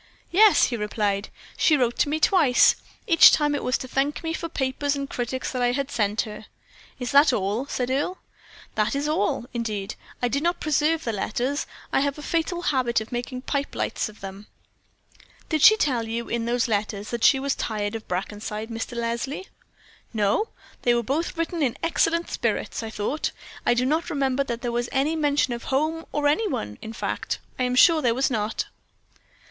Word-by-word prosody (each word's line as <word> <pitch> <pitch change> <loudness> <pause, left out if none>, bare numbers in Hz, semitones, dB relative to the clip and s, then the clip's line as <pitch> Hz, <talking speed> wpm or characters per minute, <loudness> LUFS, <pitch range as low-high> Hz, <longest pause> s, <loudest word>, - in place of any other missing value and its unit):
"Yes," 415 +3 +6
he 240 - +1
replied, 210 -1 -1 0.3
"she 305 - +4
wrote 240 -3 0
to - - +3
me 310 +2 0
twice; 310 -8 +5 0.3
each 335 -7 +8
time 295 -1 +2
it 290 - -2
was 255 - +1
to 255 - -7
thank 275 +4 -1
me 325 0 -2
for 335 0 -4
papers 280 +1 -1
and 280 0 -3
critics 255 0 -3
that 255 - -2
I 245 0 +2
had 275 +1 -2
sent 210 -4 +1
her." 215 0 -8 0.5
"That 280 +3 +5
is - - +5
all?" 210 +7 -1
said 255 -2 -2
Earle. 295 +8 -1 0.6
"That 215 +4 0
is 285 +1 -1
all, 235 -6 0
indeed. 215 -4 -3 0.3
I 245 - +1
did 280 +4 -1
not 345 +2 0
preserve 310 +2 +1
the 230 - -2
letters. 245 +8 -2 0.3
I - - +4
have 280 +1 0
a 300 - -8
fatal 340 +3 -1
habit 255 -7 +1
of 220 - -8
making 250 +1 -4
pipe 280 0 -2
lights - - -1
of 215 - -16
them." 195 +1 -8 1.0
"Did 315 -2 0
she 435 - +8
tell 245 - 0
you, 230 +1 -3
in 235 -1 -2
those 240 +1 +1
letters, 205 -1 -2
that 235 -2 -3
she 270 - +6
was 275 0 0
tired 205 -2 -3
of 225 -1 -6
Brackenside, 210 +4 -4
Mr. 230 +1 -5
Leslie?" 235 +9 -3 0.7
"No, 210 - +2 0.3
they 240 -1 +3
were 235 - 0
both 310 +8 -2
written 330 0 -2
in 250 -5 0
excellent 335 0 +1
spirits, - - -1
I 225 - -5
thought. 220 +8 -2 0.4
I - - +5
do 250 +1 +1
not 315 +5 0
remember 275 -2 +1
that 240 -1 -4
there 240 - -1
was 240 0 -1
any 285 +4 +1
mention 290 -4 +1
of 235 - -6
home 310 +4 -1
or 295 0 +1
any 420 +10 +2
one; 105 - -4
in 220 - -7
fact, 225 - -3 0.2
I 255 - +2
am 250 0 0
sure 320 +4 +6
there 235 -4 +2
was 265 +1 +1
not." 215 -1 -1
255 Hz, 195 wpm, -25 LUFS, 225-295 Hz, 1.0 s, each